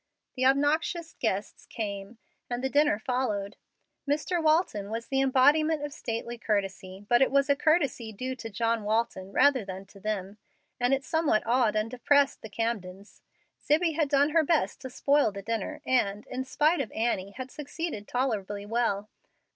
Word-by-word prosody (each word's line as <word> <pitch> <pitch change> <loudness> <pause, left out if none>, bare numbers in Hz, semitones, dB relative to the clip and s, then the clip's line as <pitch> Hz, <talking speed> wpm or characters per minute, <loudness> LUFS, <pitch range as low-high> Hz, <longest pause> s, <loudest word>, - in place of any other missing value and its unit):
The 255 0 +2
obnoxious 315 +4 +1
guests 205 -3 -2
came, 200 0 -5 0.3
and 245 +1 -3
the 265 - -1
dinner 290 -7 +3
followed. 215 -4 -2 0.5
Mr. 305 +4 0
Walton 310 - +2
was 230 +1 -4
the 270 0 +2
embodiment 290 +4 +4
of 290 - -7
stately 235 -2 -5
courtesy, 195 -2 -3
but 240 +2 +4
it 265 - +5
was 275 +1 +3
a - - +4
courtesy 285 -7 +1
due 255 +5 -4
to 225 -2 -7
John 230 +1 0
Walton 210 -3 -1
rather 265 0 +4
than 190 0 -7
to 200 +1 -17
them, 205 0 -4 0.4
and 245 +1 +2
it 270 0 +1
somewhat 320 -7 +1
awed 235 -2 +2
and 215 +2 0
depressed 280 +3 +2
the 220 - -9
Camdens. 200 -3 -4 0.4
Zibbie 320 +2 +2
had 305 -2 0
done 285 +1 +3
her 325 0 +4
best 320 0 0
to 260 - -6
spoil 280 -1 +2
the 200 0 -8
dinner, 225 -1 -3
and, 210 -5 +1
in 260 +1 -4
spite 300 +4 +2
of 235 - -5
Annie, 200 -4 -1
had 255 -1 -6
succeeded 295 -6 -5
tolerably 210 -6 -2
well. 210 -2 0
245 Hz, 170 wpm, -28 LUFS, 210-285 Hz, 0.5 s, it